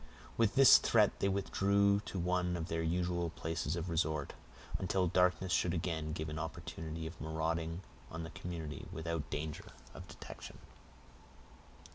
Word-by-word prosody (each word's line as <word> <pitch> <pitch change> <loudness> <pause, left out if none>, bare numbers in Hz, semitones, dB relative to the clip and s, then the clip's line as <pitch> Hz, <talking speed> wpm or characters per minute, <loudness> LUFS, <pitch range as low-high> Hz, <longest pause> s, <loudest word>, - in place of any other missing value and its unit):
With 115 -1 +2
this 135 -2 +9
threat - - +3
they 100 - +2
withdrew 100 +1 +3
to - - -4
one 90 0 +1
of 85 0 -4
their 80 0 -1
usual 85 +1 0
places 80 0 -2
of 85 +1 -3
resort, 80 -4 0 0.5
until 95 0 +1
darkness 90 +1 +2
should 85 +1 +2
again 80 -2 -2
give 80 0 -3
them 75 0 -4
an - - -1
opportunity 80 0 -6
of 80 +1 -7
marauding 80 +2 -2 0.3
on 80 0 -5
the 80 - -7
community 80 -4 -6
without 80 -2 -3
danger 75 0 -5 0.2
of - - -10
detection. - - -10
85 Hz, 150 wpm, -35 LUFS, 80-90 Hz, 0.5 s, this